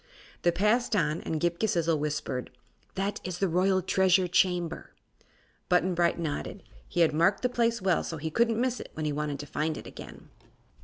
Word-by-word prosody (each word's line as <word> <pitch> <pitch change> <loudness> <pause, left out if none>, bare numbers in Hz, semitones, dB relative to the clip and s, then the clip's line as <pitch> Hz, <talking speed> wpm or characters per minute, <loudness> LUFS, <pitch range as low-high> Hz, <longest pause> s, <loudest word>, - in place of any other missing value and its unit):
They 175 - +3
passed 210 +7 +2
on, 160 -5 +1
and 160 - -3
Ghip 170 +1 0
Ghisizzle 170 -7 +1
whispered: 145 -4 -3 0.5
"That 195 +2 -2
is 180 -2 -4
the 195 - +1
Royal 185 +2 +2
Treasure 190 0 +3
Chamber." 175 -1 0 0.8
Button 180 +1 +3
Bright 170 0 +2
nodded. 170 +4 -4 0.2
He 175 - 0
had 160 -2 +4
marked 180 +8 +2
the 250 - +2
place 235 -3 0
well, 185 -3 +2
so 165 - -5
he 160 +1 -4
couldn't 230 +3 +2
miss 250 0 0
it - - -8
when 155 - -3
he 150 - 0
wanted 150 -1 -2
to - - -8
find 155 +2 -2
it - - -9
again. - - -11
175 Hz, 190 wpm, -28 LUFS, 160-195 Hz, 0.8 s, had